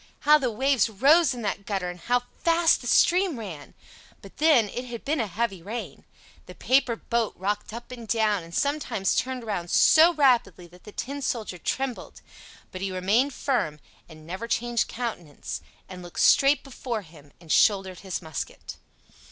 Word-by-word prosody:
how 300 Hz, +1 st, +6 dB
the 260 Hz, -3 st, 0 dB
waves 255 Hz, 0 st, +1 dB
rose 280 Hz, -, +4 dB
in 245 Hz, -3 st, -5 dB
that 205 Hz, -1 st, -3 dB
gutter, 195 Hz, -3 st, -3 dB
and 180 Hz, 0 st, -7 dB
how 245 Hz, +7 st, 0 dB, 0.2 s
fast 335 Hz, 0 st, +3 dB
the 245 Hz, -, -7 dB
stream 360 Hz, +2 st, +3 dB
ran! 180 Hz, -10 st, -9 dB, 0.5 s
But -, -, -14 dB
then 295 Hz, -8 st, +4 dB
it 245 Hz, +5 st, -6 dB
had 240 Hz, -2 st, -8 dB
been 300 Hz, +1 st, 0 dB
a 225 Hz, -, 0 dB
heavy 195 Hz, -1 st, -3 dB
rain. 220 Hz, +7 st, -7 dB, 0.4 s
The -, -, -11 dB
paper 260 Hz, -2 st, +2 dB
boat 230 Hz, -1 st, -2 dB
rocked 205 Hz, +3 st, -3 dB
up 235 Hz, +2 st, -9 dB
and 235 Hz, -3 st, -9 dB
down, 215 Hz, -3 st, +1 dB
and 165 Hz, 0 st, -13 dB
sometimes 285 Hz, -9 st, 0 dB
turned 255 Hz, -1 st, -2 dB
round 195 Hz, -6 st, -4 dB
so 320 Hz, -, +6 dB
rapidly 245 Hz, -, +2 dB
that 180 Hz, +1 st, -19 dB
the 210 Hz, -, -10 dB
Tin 280 Hz, +6 st, -5 dB
Soldier 220 Hz, -8 st, -3 dB
trembled; 260 Hz, +7 st, -4 dB, 0.5 s
but 185 Hz, -, -7 dB
he 195 Hz, -1 st, -2 dB
remained 215 Hz, +9 st, +1 dB
firm 155 Hz, -, -1 dB, 0.3 s
and 155 Hz, -1 st, -14 dB
never 185 Hz, +7 st, -6 dB
changed 235 Hz, 0 st, 0 dB
countenance, 215 Hz, -11 st, -6 dB, 0.3 s
and 185 Hz, -1 st, -9 dB
looked 175 Hz, -1 st, -5 dB
straight 275 Hz, 0 st, +5 dB
before 240 Hz, -5 st, -5 dB
him, 150 Hz, -4 st, -17 dB
and 165 Hz, -3 st, -9 dB
shouldered 190 Hz, -3 st, +3 dB
his 190 Hz, -2 st, -5 dB
musket. 160 Hz, -2 st, -7 dB
230 Hz, 175 wpm, -26 LUFS, 185-260 Hz, 0.5 s, how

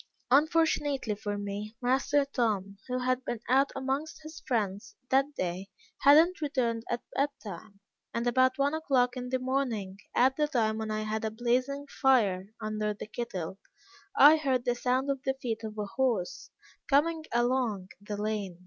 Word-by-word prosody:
Unfortunately 290 Hz, -4 st, +2 dB
for 205 Hz, 0 st, -4 dB
me, 205 Hz, +2 st, -5 dB
master 270 Hz, +3 st, +2 dB
Tom, 210 Hz, -7 st, -1 dB
who 250 Hz, 0 st, -1 dB
had 255 Hz, 0 st, 0 dB
been 240 Hz, -, -3 dB
out 270 Hz, +2 st, +4 dB
amongst 270 Hz, +4 st, -3 dB
his 315 Hz, +1 st, -9 dB
friends 205 Hz, -6 st, -2 dB, 0.2 s
that 275 Hz, +2 st, +2 dB
day, 185 Hz, +2 st, -3 dB, 0.3 s
had 285 Hz, +2 st, +7 dB
not 340 Hz, +2 st, +3 dB
returned 240 Hz, -6 st, -1 dB
at 240 Hz, -, -2 dB
bed 280 Hz, +1 st, +2 dB
time; 200 Hz, 0 st, -9 dB, 0.3 s
and 235 Hz, +1 st, -2 dB
about 255 Hz, +2 st, +3 dB
one 280 Hz, +1 st, +1 dB
o'clock 265 Hz, -6 st, +1 dB
in 250 Hz, 0 st, -5 dB
the 260 Hz, -, +1 dB
morning, 250 Hz, -7 st, -2 dB, 0.2 s
at 260 Hz, +2 st, +4 dB
the 300 Hz, -1 st, +2 dB
time 220 Hz, -6 st, 0 dB
when 220 Hz, 0 st, -3 dB
I 215 Hz, 0 st, -1 dB
had 215 Hz, +1 st, -3 dB
a 220 Hz, -, 0 dB
blazing 250 Hz, +5 st, -1 dB
fire 225 Hz, -10 st, +2 dB
under 215 Hz, -1 st, -2 dB
the -, -, -7 dB
kettle, 200 Hz, -5 st, -5 dB, 0.6 s
I 310 Hz, -5 st, +9 dB
heard 265 Hz, -5 st, 0 dB
the 245 Hz, -, +2 dB
sound 255 Hz, +3 st, 0 dB
of 270 Hz, -1 st, -3 dB
the 265 Hz, 0 st, -1 dB
feet 230 Hz, -4 st, -4 dB
of 215 Hz, -1 st, -6 dB
a 210 Hz, -, -2 dB
horse 225 Hz, -5 st, -1 dB, 0.4 s
coming 315 Hz, +3 st, +2 dB
along 240 Hz, -5 st, 0 dB
the 205 Hz, 0 st, -5 dB
lane. 205 Hz, -4 st, -3 dB
245 Hz, 170 wpm, -29 LUFS, 215-275 Hz, 0.6 s, I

